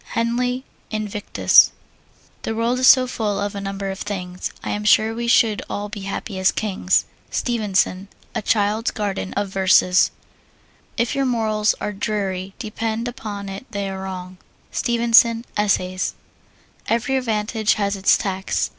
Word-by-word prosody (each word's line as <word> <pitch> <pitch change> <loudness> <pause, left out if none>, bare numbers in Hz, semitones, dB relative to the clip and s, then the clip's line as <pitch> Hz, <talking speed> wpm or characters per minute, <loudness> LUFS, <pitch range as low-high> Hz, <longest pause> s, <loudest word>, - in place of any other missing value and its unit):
HENLEY, 245 +2 0 0.3
Invictus. 210 -1 +3 0.7
The 225 - -3
world 235 +3 0
is 255 - +4
so 255 -1 +8
full 215 -5 -2
of 205 0 -2
a 200 - -5
number 195 0 -4
of 190 - -7
things, 180 -3 -4
I - - -3
am 210 - -2
sure 215 +1 +4
we 235 +1 -3
should 225 -3 +4
all 205 0 -4
be 210 0 -6
happy 195 -1 -4
as 185 - +4
kings. 190 -3 +1 0.2
STEVENSON, 200 -5 0 0.3
A - - -2
Child's 215 +2 +1
Garden 200 -3 -3
of 205 0 -1
Verses. 190 -1 +4 0.9
If 235 -1 +1
your 275 -1 0
morals 220 -3 +1
are 210 - -3
dreary, 195 -2 -3
depend 225 +1 -3
upon 210 -5 -6
it 195 +6 -7
they 200 -2 -3
are 190 0 -6
wrong. 185 -1 -7 0.3
STEVENSON, 235 0 +3
Essays. 185 -3 0 0.7
Every 235 +4 0
advantage 220 -3 0
has 200 -1 0
its 195 0 +4
tax. 190 -1 -2
210 Hz, 145 wpm, -21 LUFS, 195-230 Hz, 0.9 s, so